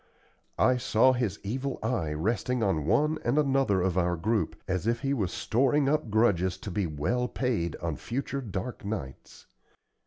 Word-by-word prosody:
I 130 -1 +4
saw 125 +1 +4
his 120 -7 -1
evil 130 +6 -3
eye 110 -10 -1
resting 115 +9 -1
on 80 -7 0
one 150 - +2
and 120 +5 +1
another 135 -9 +2
of 95 -1 +1
our 90 -1 +1
group, 105 +5 0
as 95 +2 -1
if 115 0 +1
he 135 0 0
was 100 -10 -1
storing 135 +4 +1
up 150 -4 +1
grudges 95 -5 +2
to 100 - -5
be 95 0 0
well 80 +12 -1
paid 115 -12 -1
on 80 -4 -4
future 135 - -3
dark 110 +1 -5
nights. 100 - -6
110 Hz, 165 wpm, -28 LUFS, 90-130 Hz, -, I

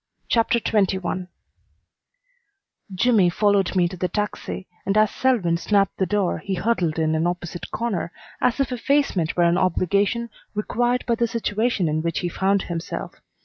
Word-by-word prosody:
CHAPTER 235 0 +3
XXI 190 -4 0 1.7
Jimmy 205 -3 +4
followed 200 +1 +2
me 180 - +4
into 175 +1 -2
the 180 - 0
taxi, 210 -1 -4 0.2
and 195 +2 0
as 215 -1 +4
Selwyn 215 -11 +1
snapped 195 +2 +1
the 190 - 0
door 205 -4 0
he 195 - -3
huddled 180 -7 0
in 160 -1 +1
an 160 +2 +1
opposite 175 -1 -4
corner 210 -8 -2 0.3
as 250 +1 +2
if 270 -2 0
effacement 250 - 0
were 175 - +4
an 170 +1 +3
obligation 200 +6 +1 0.2
required 240 +4 0
by 235 - +1
the 235 +1 +1
situation 220 -3 0
in 155 +1 0
which 165 0 -2
he 175 - -1
found 195 +3 +1
himself. 170 -1 -5
195 Hz, 155 wpm, -23 LUFS, 175-230 Hz, 1.7 s, Jimmy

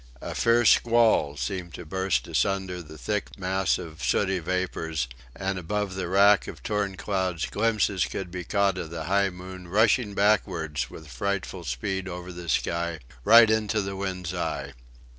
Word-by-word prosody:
A - - -4
fierce 115 -1 +4
squall 115 -11 +3
seemed 90 +1 -4
to 90 - -8
burst 95 -6 -1
asunder 95 -2 0
the 80 -1 -12
thick 105 +7 -3
mass 95 0 +1
of 80 -3 -9
sooty 95 -2 +1
vapours; 80 -5 -2 0.3
and 95 -1 -2
above 100 +3 -2
the 95 -1 -3
wrack 100 +2 +5
of - - -9
torn 105 -3 -1
clouds 95 -4 -1
glimpses 105 -4 +1
could 90 -3 -5
be 90 0 -5
caught 100 0 +1
of 80 - -5
the 80 -1 -5
high 100 +3 +2
moon 90 0 -9
rushing 105 +2 +2
backwards 80 -10 +1
with 80 - -11
frightful 95 +6 -3
speed 95 +9 -3
over 90 0 -6
the 85 -1 -8
sky, 85 +1 0 0.3
right 115 - +8
into 110 0 +1
the 100 -1 -3
wind's 95 -2 -4
eye. 70 -5 -3
95 Hz, 160 wpm, -26 LUFS, 85-100 Hz, 0.3 s, right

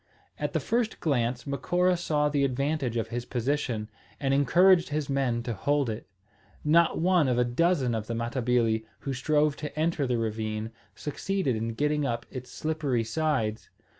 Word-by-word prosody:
At - - -2
the - - +2
first 230 -1 -1
glance 125 -5 0
Macora 180 +6 +1
saw 150 -4 +1
the 145 -1 +1
advantage 135 -1 0
of 115 -1 -2
his 120 0 -3
position, 120 -3 -1 0.3
and 135 -1 +1
encouraged 175 +6 +5
his 150 -1 -2
men 125 -4 0
to 120 - -3
hold 140 +4 +1
it. 110 -1 -7 0.6
Not 165 +3 +4
one 175 -3 +3
of 125 -2 +1
a 125 - +4
dozen 135 0 +1
of 110 -1 -3
the 115 - -2
Matabili, 115 -1 +1 0.2
who 135 - -3
strove 150 +3 +2
to 150 0 -6
enter 160 -3 +1
the 125 -1 +1
ravine, 110 0 -2 0.2
succeeded 150 -2 -1
in 115 +1 -3
getting 150 +2 +1
up 120 -2 -2
its 125 -2 -7
slippery 150 -7 -1
sides. 115 -4 -1
135 Hz, 165 wpm, -28 LUFS, 120-155 Hz, 0.6 s, encouraged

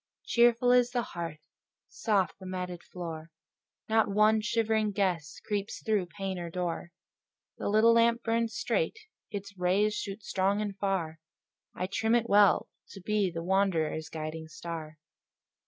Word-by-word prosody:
Cheerful 240 +1 +4
is 245 -1 +5
the 245 -1 -1
hearth, 165 -5 -6 0.5
soft 200 -5 0
the 190 - -9
matted 180 -1 -4
floor; 165 -3 -7 0.6
Not 220 -1 +3
one 215 +2 +4
shivering 220 -1 +1
gust 180 -6 -1
creeps 205 -1 -3
through 210 -5 +1
pane 190 +1 -4
or 170 -1 -5
door; 175 0 -3 0.7
The - - -1
little 220 +2 +5
lamp 235 +1 +3
burns 230 -1 0
straight, 480 -2 0 0.3
its 200 -1 -6
rays 195 +4 +2
shoot 205 0 -5
strong 195 +2 +1
and 205 -2 -3
far: 190 -5 -2 0.6
I 180 - -2
trim 220 +4 +1
it 235 -1 +1
well, 205 -2 +5 0.2
to 195 - -11
be 205 0 +1
the 165 -1 -5
wanderer's 170 -4 +1
guiding 160 0 -5
star. 155 -1 -7
195 Hz, 145 wpm, -30 LUFS, 175-220 Hz, 0.7 s, is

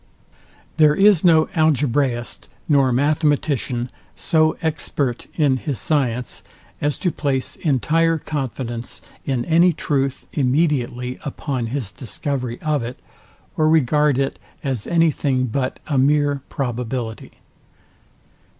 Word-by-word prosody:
There 150 -2 +5
is 195 -2 +5
no 160 -3 +6
Algebraist 140 -6 +1 0.2
nor 140 -5 +4
Mathematician 140 -3 0 0.2
so 155 -1 +2
expert 140 -5 -1
in 145 -5 +3
his 135 0 -3
science, 125 -6 -1 0.4
as 145 0 0
to 180 - 0
place 135 -5 -2
entire 165 +3 +2
confidence 125 -5 -4 0.2
in 130 -3 0
any 170 +2 +4
truth 140 -3 -1
immediately 125 -3 0
upon 135 -4 -3
his 120 -4 -3
discovery 125 -1 -4
of 150 -3 0
it, 120 +2 -6 0.6
or 155 0 +3
regard 150 -2 +3
it 135 0 -1 0.2
as 130 -7 -3
any 165 -1 +3
thing, 135 -3 0
but 130 +2 -2
a 140 -4 0
mere 145 0 +2
probability. 120 -3 -4
140 Hz, 115 wpm, -21 LUFS, 125-155 Hz, 0.6 s, no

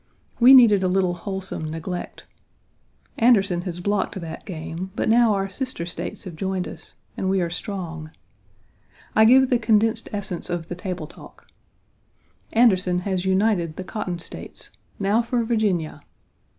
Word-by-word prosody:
We 255 +3 +9
needed 220 -6 +7
a 185 - +1
little 185 -1 +1
wholesome 190 -3 -5
neglect. 165 +3 -6 0.9
Anderson 200 -7 +4
has 175 0 -6
blocked 200 +1 -1
that 165 +3 -8
game, 170 +1 -6
but - - -1
now 230 -1 +4
our 195 0 -1
sister 225 -3 -3
States 175 - -5
have 180 -3 -8
joined 190 0 -2
us, - - -11 0.2
and 190 - -2
we 190 0 +2
are 170 -2 -1
strong. 170 -5 -5 1.1
I 220 - +6
give 260 +3 +6
the 245 - +3
condensed 225 0 +2
essence 190 -4 -4
of 175 -2 -4
the 175 - -4
table 180 -3 -5
talk: 150 - -15 1.1
"Anderson 185 -6 +3
has 185 -1 -2
united 190 -4 +1
the 185 - -5
cotton 185 -3 -4
States. 170 - -5 0.3
Now 205 +3 +2
for 235 0 -1
Virginia!" 210 -8 -1
190 Hz, 150 wpm, -23 LUFS, 175-220 Hz, 1.1 s, We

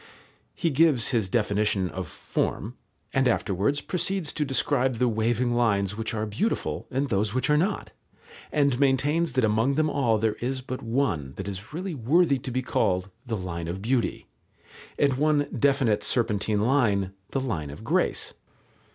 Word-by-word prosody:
He 165 - 0
gives 145 -4 +3
his 115 -7 0
definition 105 -2 +1
of 90 +1 -5
form, 110 +4 -2 0.4
and 135 -1 +3
afterwards 110 +4 +1
proceeds 185 -2 -1
to 150 - 0
describe 135 -2 +1
the 125 +2 +2
waving 120 +2 +1
lines 105 -5 +1
which 115 +2 -3
are 110 0 -1
beautiful 110 - -2
and 135 +1 -1
those 105 +1 0
which 130 +3 +1
are - - +5
not, 185 +7 -1 0.6
and 140 -4 +2
maintains 145 +3 +2
that 130 -1 +2
among 110 +6 +2
them 155 +1 +2
all 120 -6 +2
there 110 0 0
is 130 +2 -2
but 130 0 -6
one 115 - -1
that 95 - -6
is 100 +1 -6
really 180 +4 -4
worthy 140 +3 +3
to 130 - -6
be 130 +1 -1
called 95 -6 0 0.2
"the 115 -2 -1
line 85 -3 -5
of 90 +3 -4
beauty," 120 +1 0 0.7
and 140 -3 +2
one 150 -1 +2
definite 135 -6 +2
serpentine 105 -3 +1
line 105 -6 +2 0.2
"the 135 - -1
line 100 - -3
of 70 - -9
grace." - - 0
120 Hz, 165 wpm, -26 LUFS, 105-140 Hz, 0.7 s, are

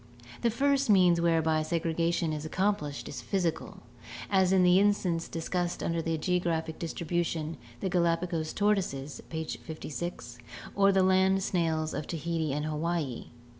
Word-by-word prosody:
The 235 - +3
first 275 +2 +1
means 180 -4 +5
whereby 160 -2 +2
segregation 165 0 0
is 150 -1 -4
accomplished 155 -3 -1
is - - -6
physical, 180 -5 -2 0.5
as 190 -2 +4
in 190 -1 +5
the 180 +1 +6
instance 190 -5 +1
discussed 175 +1 -2
under 165 0 0 0.2
geographic 165 -1 -1
distribution 165 -1 -2
— 115 - -21
the - - -1
Galapagos 170 -2 0
tortoises 185 -10 -1
(page 160 -1 -4
56)— 155 -6 -6 0.3
or 200 0 +4
the 190 -1 +3
land 190 +1 +3
snails 160 -4 0
of 150 - -4
Tahiti 165 -1 -2
and 150 +2 -2
Hawaii. 155 -3 -2
170 Hz, 135 wpm, -29 LUFS, 160-185 Hz, 0.5 s, the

